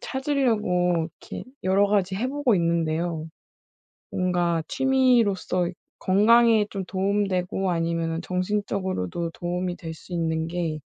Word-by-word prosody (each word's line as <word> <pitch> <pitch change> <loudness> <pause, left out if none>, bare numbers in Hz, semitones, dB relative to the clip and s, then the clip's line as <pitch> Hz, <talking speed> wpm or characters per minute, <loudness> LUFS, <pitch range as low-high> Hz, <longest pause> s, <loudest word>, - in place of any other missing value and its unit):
찾으려고 210 - 0
이렇게 - - -8 0.2
여러 195 +2 +3
가지 195 -2 +1
해 230 +6 -1
보고 270 -6 +1
있는데요. 165 -1 0 0.8
뭔가 175 -2 +1
취미로서 235 -10 +2 0.3
건강에 220 +2 +4
좀 195 -2 -4
도움 200 +2 0
되고 185 0 -1
아니면은 165 -1 -1
정신적으로도 185 - -2
도움이 175 +1 -3
될 165 -2 -6
수 175 - -12
있는 160 -1 -1
게 165 -2 -2
185 Hz, 275 characters per minute, -25 LUFS, 170-205 Hz, 0.8 s, 건강에